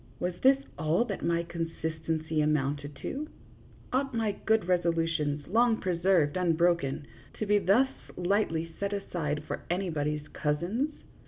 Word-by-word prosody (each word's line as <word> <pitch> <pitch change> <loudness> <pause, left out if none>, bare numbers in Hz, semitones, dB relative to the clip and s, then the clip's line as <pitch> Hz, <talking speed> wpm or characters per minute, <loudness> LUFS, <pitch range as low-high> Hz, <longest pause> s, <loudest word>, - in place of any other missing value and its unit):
Was 180 0 -1
this 265 +1 +6 0.2
all 160 +9 +2
that 200 -4 -4
my 170 0 +1
consistency 160 -2 -2
amounted 145 -1 0
to? 295 +3 -3 0.7
Ought 270 -1 0
my 225 -2 +1 0.2
good 220 0 +5
resolu 170 -2 +1
tions, 145 -3 -1
long 230 +3 +4
preserved 175 -5 +2
unbroken, 170 -5 +2 0.3
to 215 - -2
be 205 0 +4
thus 205 +8 +4 0.3
lightly 175 -3 0
set 200 0 -1
aside 155 -7 -2
for - - -5
anybody's 150 -5 -1
cousins 175 - -1
170 Hz, 135 wpm, -29 LUFS, 155-200 Hz, 0.7 s, this